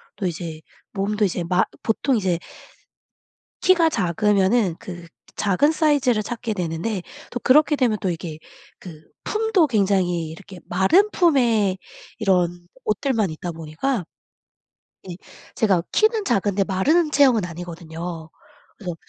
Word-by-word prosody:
또 200 - -4
이제 165 -2 -6 0.3
몸도 210 +2 0
이제 180 -2 -2
마 180 +2 +2 0.2
보통 250 +4 +1
이제 185 -5 0 1.2
키가 350 -3 +4
작으면은 200 - +1
그 175 -2 -9 0.3
작은 215 +10 +2
사이즈를 285 -8 +2
찾게 230 +1 -4
되는데 180 +3 -3 0.3
또 245 - -4
그렇게 295 +3 +4
되면 240 -6 +1
또 190 - -1
이게 165 -2 -6 0.4
그 160 -4 -11 0.2
품도 430 -6 +2
굉장히 190 - +1
이렇게 190 +3 -11
마른 195 - +3
품의 235 - +2 0.4
이런 175 -4 +1 0.2
옷들만 215 - 0
있다 170 +2 -5
보니까 165 - -3 1.0
네 180 -2 -7 0.4
제가 195 -6 +2
키는 435 -1 +2
작은데 200 - +1
마른 300 - +2
체형은 265 -8 +4
아니거든요. 170 -1 -7 0.5
그래서 180 -4 -5
195 Hz, 260 characters per minute, -22 LUFS, 175-250 Hz, 1.2 s, 키가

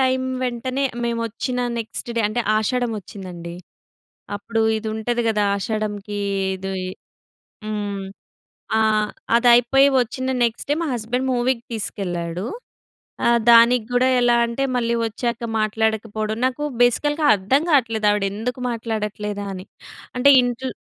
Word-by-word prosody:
Time 260 0 +2 0.2
వెంటనే 255 +2 -2 0.2
మేమొచ్చిన 235 +2 -2 0.2
next 230 +1 -6
day - - +3
అంటే 240 +3 -1 0.2
ఆషాఢం 245 +2 0
వచ్చిందండి. 180 -4 -9 0.8
అప్పుడు 225 +2 -2 0.2
ఇది 220 0 -4
ఉంటది 240 +2 -1
కదా! 210 -2 +1
ఆషాఢంకి 205 -1 -3 0.4
ఇది 190 +1 -5 0.9
హ్మ్. 205 -2 -3 0.7
ఆ! - - +3 0.6
అదయిపోయి 245 +3 +5
వచ్చిన 260 +2 -2
నెక్స్ట్ 230 +2 -1
డే 290 - +4
మా 330 - -1
హస్బెండ్ 245 +3 -2
మూవీకి 245 -1 0
తీసుకెళ్ళాడు. 180 -4 -4 0.8
ఆహ్, 235 0 +4
దానికి 235 0 +6
కూడా 250 +1 +3
ఎలా 240 0 +4
అంటే 235 +3 -2
మళ్ళీ 235 -1 0
వచ్చాక 235 +1 -3
మాట్లాడకపోవడం. 220 0 -1
నాకు 260 +3 -1 0.2
బేసికల్‌గా 295 +5 +2
అర్థం 210 +10 +1
కావట్లేదు. 225 -6 +2
ఆవిడెందుకు 210 +5 -2
మాట్లాడట్లేదా 210 -3 -3
అని. 185 +1 -8 0.5
అంటే 280 +3 +5
ఇంట్లో 245 +1 -2
230 Hz, 120 wpm, -22 LUFS, 210-245 Hz, 0.9 s, దానికి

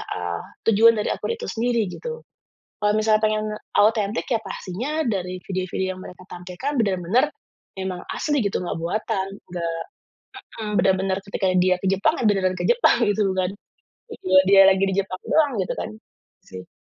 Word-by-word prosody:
eee, 90 -1 -3 0.3
tujuan 225 +2 +6
dari 210 - 0
akun 465 - -3
itu 465 - -8
sendiri, 235 0 +1
gitu. 475 - -7 0.6
Kalau 210 - +4
misalnya 215 0 +3
pengen 215 0 +1 0.3
autentik, 210 0 +2
ya 230 -3 0
pastinya 205 +10 -5 0.2
dari 185 -4 -2
video-video 185 0 -2
yang 185 - -11
mereka 180 0 -12
tampilkan 180 +11 -5
benar-benar 200 - +1 0.5
memang 190 -1 -3
asli 295 -2 0
gitu, 200 - 0
nggak 175 - -3
buatan, 190 +2 -2 0.2
nggak 170 -2 -2 0.9
heeh, 210 -1 -4
benar-benar 190 0 +1
ketika 200 0 -2
dia 185 0 +3
ke 195 - -2
Jepang, 195 +1 +2
ya - - -1
beneran 190 -2 +1
ke - - -3
Jepang, 480 0 +4
gitu, 205 -1 +2
bukan, 185 -1 0 0.6
video 190 - +2
dia 195 -1 +9
lagi 195 0 +2
di 190 - -1
jepang 190 -1 -6
doang, 300 -3 +3
gitu 185 - -1
kan? - - -4 0.6
Sih. 95 0 -10
195 Hz, 165 wpm, -23 LUFS, 185-220 Hz, 0.9 s, dia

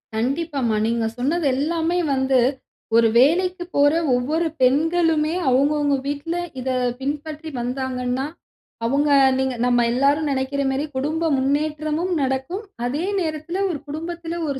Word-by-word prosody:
கண்டிப்பாம்மா. 265 -1 -1
நீங்க 230 -1 0
சொன்னது 300 +7 0
எல்லாமே 325 +4 0 0.2
வந்து 265 -1 +2 0.6
ஒரு 230 0 +6
வேலைக்கு 350 +7 +3
போற 285 0 +5 0.2
ஒவ்வொரு 305 +7 0
பெண்களுமே 320 +4 +2
அவுங்கவுங்க 285 +2 +2
வீட்ல 290 +4 -3 0.2
இத 260 +1 -3 0.3
பின்பற்றி 300 +3 -4
வந்தாங்கன்னா, 250 +1 -2 0.6
அவுங்க 280 +5 +1 0.3
நீங்க 265 -1 0
நம்ம 245 -1 +3
எல்லாரும் 280 +5 +2
நெனக்கிற 270 +1 -1
மாரி 270 +3 -1
குடும்ப 310 +5 -1
முன்னேற்றமும் 305 +5 -1
நடக்கும், 265 +9 -2 0.2
அதே 290 +8 -1 0.2
நேரத்துல 315 +1 -3
ஒரு 320 -5 -3
குடும்பத்துல, 335 +2 -5
ஒரு 270 - -3
285 Hz, 120 wpm, -22 LUFS, 265-320 Hz, 0.6 s, ஒரு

